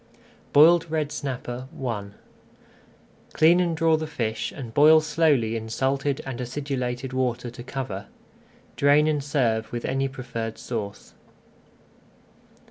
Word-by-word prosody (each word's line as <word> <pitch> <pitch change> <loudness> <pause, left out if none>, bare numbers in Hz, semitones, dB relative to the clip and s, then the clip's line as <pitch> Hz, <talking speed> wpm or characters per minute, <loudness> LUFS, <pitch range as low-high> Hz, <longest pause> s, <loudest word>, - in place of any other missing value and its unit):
BOILED 165 +3 +6
RED 155 -2 -1
SNAPPER 130 -3 -5
I 115 -6 -3 1.3
Clean 170 +3 +5
and 170 -2 0
draw 160 -1 +3
the 155 0 -4
fish 115 -7 -3
and 120 -5 -8
boil 155 +4 +7
slowly 150 -7 +1
in 110 0 -5
salted 135 +3 -1
and 130 -2 -5
acidulated 130 -1 -3
water 125 -2 -1
to 120 - -10
cover. 120 -6 -5 0.7
Drain 145 +2 +4
and 150 -2 0
serve 115 -6 0
with 120 -1 -4
any 135 +1 0
preferred 115 -4 -5
sauce. 105 -5 -6
130 Hz, 125 wpm, -25 LUFS, 120-150 Hz, 1.3 s, boil